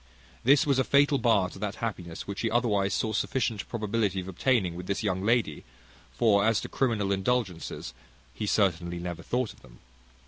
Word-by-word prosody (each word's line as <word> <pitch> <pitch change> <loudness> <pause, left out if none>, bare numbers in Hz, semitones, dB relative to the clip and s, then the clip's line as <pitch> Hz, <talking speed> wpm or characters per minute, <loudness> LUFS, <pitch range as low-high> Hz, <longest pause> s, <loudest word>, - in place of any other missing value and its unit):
This 140 +4 +5
was 140 -3 +2
a - - +4
fatal 140 +1 +3
bar 110 -6 +3
to - - -11
that 105 -1 -3
happiness 90 -7 -5
which 100 0 -5
he 115 - 0
otherwise 105 -4 +1
saw 110 - -1
sufficient 115 -1 -1
probability 105 -3 -1
of 90 - -6
obtaining 95 -1 +1
with 90 +1 -8
this 100 - -1
young 95 -2 -1
lady; 110 -9 +1 0.5
for 105 -4 +3
as 110 0 +3
to - - -5
criminal 110 -7 0
indulgences, 95 -3 -2 0.4
he 105 - -4
certainly 85 -4 +1
never 85 -1 -5
thought 125 +6 -2
of - - -23
them. - - -17
105 Hz, 180 wpm, -28 LUFS, 95-120 Hz, 0.5 s, This